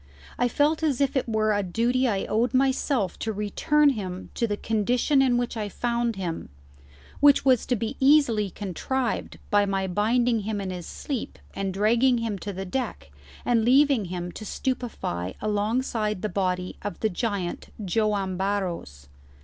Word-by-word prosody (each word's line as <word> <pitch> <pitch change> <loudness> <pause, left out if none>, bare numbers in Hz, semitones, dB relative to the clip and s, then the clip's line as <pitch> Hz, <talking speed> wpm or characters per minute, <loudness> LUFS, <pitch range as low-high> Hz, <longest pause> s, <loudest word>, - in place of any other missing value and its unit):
I 245 - +3
felt 295 +6 +2
as 295 -6 +1
if 280 -1 +1
it 260 -3 0
were 215 -1 +2
a 205 - +1
duty 235 +7 +1
I 200 -4 0
owed 235 +4 0
myself 260 - +1
to 225 - -2
return 220 +9 +2
him 185 -6 -5
to 235 - 0
the 205 -1 -2
condition 245 +7 +2
in 250 -2 +3
which 245 0 -2
I 210 -2 -3
found 235 +1 -1
him, 175 -4 -4 0.7
which 285 -1 +5
was 255 -4 +4
to 250 - +2
be 225 +4 -3
easily 265 -7 +4
contrived 225 +7 -3
by 205 -1 +4
my 195 -1 0
binding 230 +5 +2
him 210 0 -3
in 195 -2 -3
his 180 -2 -6
sleep 270 -6 -5 0.2
and 195 -1 -2
dragging 230 +6 +3
him 225 -4 -2
to 205 - -5
the 190 0 -5
deck 185 - -4 0.3
and 235 -2 +3
leaving 265 -2 +4
him 175 0 -5
to 215 - -9
stupefy 215 - -3
alongside 215 -1 -1
the 215 - 0
body 180 -1 -1
of 205 - -5
the 220 - +2
giant 195 -3 -3 0.2
Joam 200 -1 0
Barros. 180 - -3
215 Hz, 165 wpm, -26 LUFS, 195-245 Hz, 0.7 s, which